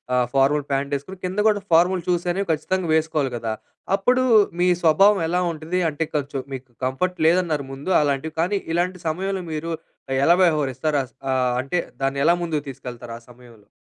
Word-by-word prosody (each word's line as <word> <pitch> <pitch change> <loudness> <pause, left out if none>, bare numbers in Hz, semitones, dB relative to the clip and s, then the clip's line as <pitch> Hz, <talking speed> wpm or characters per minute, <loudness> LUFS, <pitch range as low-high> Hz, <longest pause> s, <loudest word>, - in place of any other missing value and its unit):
ఆహ్, 125 -1 +2
formal 140 +2 +3
pant 140 +1 -1
వేసుకొని, 185 +8 -7
కింద 185 +3 -3
కూడా 205 -2 +2
ఫార్మల్ 180 +2 +4
షూస్ 175 -1 0
అనేవి 195 0 -3
ఖచ్చితంగా 175 +3 -1
వేసుకోవాలి 155 -4 0
కదా! 115 -1 -3 0.4
అప్పుడు 250 +6 +2 0.4
మీ 180 - +3
స్వభావం 195 +5 +5
ఎలా 175 +2 +1
ఉంటుంది? 165 +3 -3
అంటే 150 +1 -2
కొంచెం 140 -2 -2
మీకు 130 -1 -7 0.2
కంఫర్ట్ 180 +8 -1
లేదన్నారు 165 -4 +1
ముందు. 140 +7 -5
అలాంటివి 145 +2 -1
కానీ, 195 +4 0
ఇలాంటి 180 +1 0
సమయంలో 190 +3 -2
మీరు 165 +2 -4 0.5
ఎలా 170 - +6
వ్యవహరిస్తారు? 150 -2 +1 0.3
ఆహ్, 125 -1 +1
అంటే 140 +7 -1 0.2
దాన్ని 135 +1 0
ఎలా 170 +2 +5
ముందుకు 155 -4 -2
తీసుకెళ్తారు 120 -2 -8
ఆ - - -24
సమయంలో? 120 -4 -18
155 Hz, 165 wpm, -22 LUFS, 135-180 Hz, 0.5 s, ఎలా